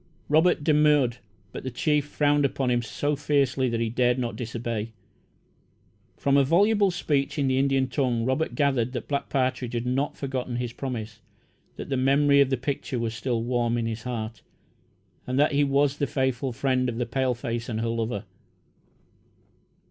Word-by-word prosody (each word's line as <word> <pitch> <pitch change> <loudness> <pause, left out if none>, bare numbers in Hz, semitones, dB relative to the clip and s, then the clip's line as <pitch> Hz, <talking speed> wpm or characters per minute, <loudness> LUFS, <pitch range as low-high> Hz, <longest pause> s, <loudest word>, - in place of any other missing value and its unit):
Robert 160 +1 +3
demurred, 150 -5 +3 0.3
but - - -7
the 130 - -3
chief 150 +3 +1
frowned 145 0 +2
upon 135 -2 0
him 120 0 +2
so 145 +6 -2
fiercely 140 -3 +1
that 115 -1 -1
he 115 -1 -1
dared 125 +1 +2
not 120 -2 -2
disobey. 115 -2 -4 1.2
From 140 0 +2
a 140 - +5
voluble 200 +7 +3
speech 145 -6 -1
in 140 -2 +1
the 130 0 +2
Indian 135 -1 +2
tongue, 125 -4 0
Robert 130 +5 -1
gathered 135 -5 +1
that 125 - -5
Black 140 -1 -2
Partridge 130 -2 -1
had 120 +1 -2
not 135 +4 -1
forgotten 130 -3 -3
his 120 -1 -3
promise 115 -5 -5 0.6
that - - -7
the 135 - 0
memory 140 +2 +4
of 135 - +3
the 135 - +1
picture 135 0 -3
was 115 -1 -2
still 120 0 -2
warm 120 -1 0
in 115 - -1
his 110 -1 -3
heart, 115 -2 -5 0.9
and 130 +1 -1
that 150 +2 +4
he 145 0 +3
was 140 0 +2
the 140 - 0
faithful 130 0 -1
friend 130 +1 0
of 115 - -5
the 120 - -1
paleface 120 -2 -2
and 110 -1 -2
her 115 - -1
lover. 115 -2 -2
130 Hz, 175 wpm, -26 LUFS, 120-140 Hz, 1.2 s, a